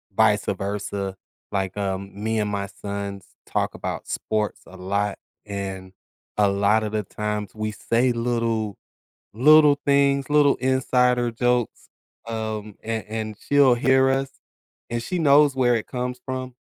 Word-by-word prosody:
vice-versa, 100 -2 0 0.4
like, 95 -2 -2
um, 100 -1 -2
me 110 0 0
and 105 - 0
my 100 -1 -2
sons 100 -1 -6 0.2
talk - - -1
about - - -5
sports 105 -1 -2
a 95 - -13
lot, 100 +2 -1 0.3
and 95 -2 -5 0.5
a 105 - +4
lot 100 +2 +2
of 105 0 -4
the 105 -1 0
times, 105 0 -4
we 110 0 -3
say 120 +3 +1
little 115 -3 -1 0.6
little 145 +4 +6
things, 140 -1 +3
little 145 -1 +5
insider 125 -1 +2
jokes, 125 -1 -1 0.4
um, 110 -2 -4
and 110 -1 -2
and 110 -1 -4
she'll 140 -3 +4
hear 130 +2 +4
us, 135 0 0 0.6
and 120 0 -1
she 180 - -3
knows 145 -2 +5
where 125 -2 +3
it 110 -2 -3
comes 125 0 -4
from, 130 -1 -4
110 Hz, 140 wpm, -23 LUFS, 100-130 Hz, 0.6 s, little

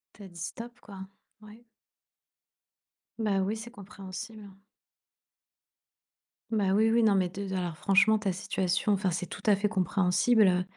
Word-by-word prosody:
Tu 205 - -13
as - - -9
dit: 170 -1 -13
«Stop», 235 +7 -7
quoi. 200 -3 -12 0.4
Ouais. 215 +3 -15 1.5
Bah, 210 -3 0
oui, 200 +3 -1
c'est 230 +2 -9
compréhensible. 205 0 -9 2.0
Bah, 200 -3 +1
oui, 220 +1 +3
oui. 235 0 +3
Non, 210 -3 +4
mais, 185 -2 +1
te 200 - -7
de 190 - -4
alors, 175 -3 -3
franchement, 200 +4 +3
ta 200 -3 -1
situation 190 0 -1
enfin, 195 -1 0
c'est 180 +1 -3
tout - - -9
à 205 - +6
fait 205 +2 0
compréhensible, 200 +2 +2
heu. 180 0 +2
200 Hz, 155 wpm, -28 LUFS, 185-220 Hz, 2.0 s, à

